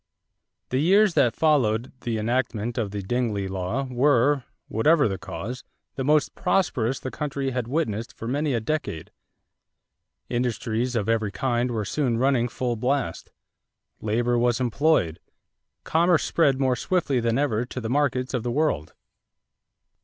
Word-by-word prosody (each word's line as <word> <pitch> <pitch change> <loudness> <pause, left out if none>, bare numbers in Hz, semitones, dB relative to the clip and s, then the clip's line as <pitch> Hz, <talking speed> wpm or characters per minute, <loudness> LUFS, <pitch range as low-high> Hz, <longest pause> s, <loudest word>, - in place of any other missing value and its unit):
= - - -56
The 130 - +1
years 195 +5 +4
that 120 -7 +3
followed 125 -7 +2
the 115 -2 -2
enactment 115 0 -1
of 110 -4 -1
the 100 0 -5
Dingley 105 -2 -1
law 95 +7 -2
were, 130 +1 +2 0.2
whatever 145 +7 +3
the 95 -3 -3
cause, 100 +6 -6 0.3
the 135 - -3
most 150 +2 +2
prosperous 135 -10 0
the 130 - -5
country 140 -3 -3
had 125 -2 -2
witnessed 120 -6 -2
for 115 - -8
many 140 +2 0
a - - +1
decade. 120 - -3 1.2
Industries 120 0 -1
of 105 -4 0
every 110 -2 +1
kind 120 +3 0
were 110 -3 -2
soon 125 -4 0
running 125 -1 +2
full 120 0 -2
blast; 125 -5 -2 0.7
labor 120 +3 +1
was 120 0 +2
employed; 125 - +1 0.6
commerce 170 +1 +3
spread 140 -5 +2
more 130 -2 +2
swiftly 145 -2 0
than 115 0 +1
ever 125 -6 +1
to 130 - -6
the 115 - -4
markets 130 -1 0
of 125 - 0
the 120 - -3
world. 120 - -1
125 Hz, 150 wpm, -25 LUFS, 115-140 Hz, 1.2 s, years